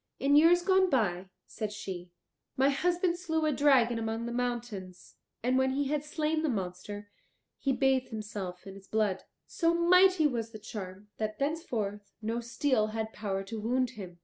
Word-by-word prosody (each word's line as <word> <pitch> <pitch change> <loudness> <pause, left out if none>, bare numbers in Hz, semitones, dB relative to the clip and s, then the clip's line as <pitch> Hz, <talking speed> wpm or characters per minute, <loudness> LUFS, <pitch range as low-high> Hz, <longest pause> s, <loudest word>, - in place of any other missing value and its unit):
"In 280 +1 +3
years 340 +4 +6
gone 375 0 +4
by," 190 - 0 0.2
said 215 -1 -5
she, 190 -4 -6 0.5
"my 270 +1 +4
husband 350 +3 +1
slew 320 -3 0
a 305 - +3
dragon 260 -5 +4
among 225 +1 -2
the 235 - -4
mountains, 235 -7 -4 0.3
and 255 +2 +3
when 265 0 +2
he 280 0 0
had 295 -1 0
slain 310 +1 -1
the 315 - 0
monster, 205 0 -5 0.5
he 275 - +1
bathed 265 -1 +2
himself 205 -5 -6
in 195 0 -9
its 195 0 -14
blood. 210 -3 0 0.2
So 335 0 +1
mighty 365 0 +5
was 235 -6 0
the - - -6
charm, 205 -2 -8
that 215 -1 -3
thenceforth 235 - -3
no 225 +1 -2
steel 235 -1 +1
had 220 0 -4
power 195 -2 -3
to 220 +2 -6
wound 250 +2 +1
him. 185 -7 -9
235 Hz, 175 wpm, -30 LUFS, 205-290 Hz, 0.5 s, years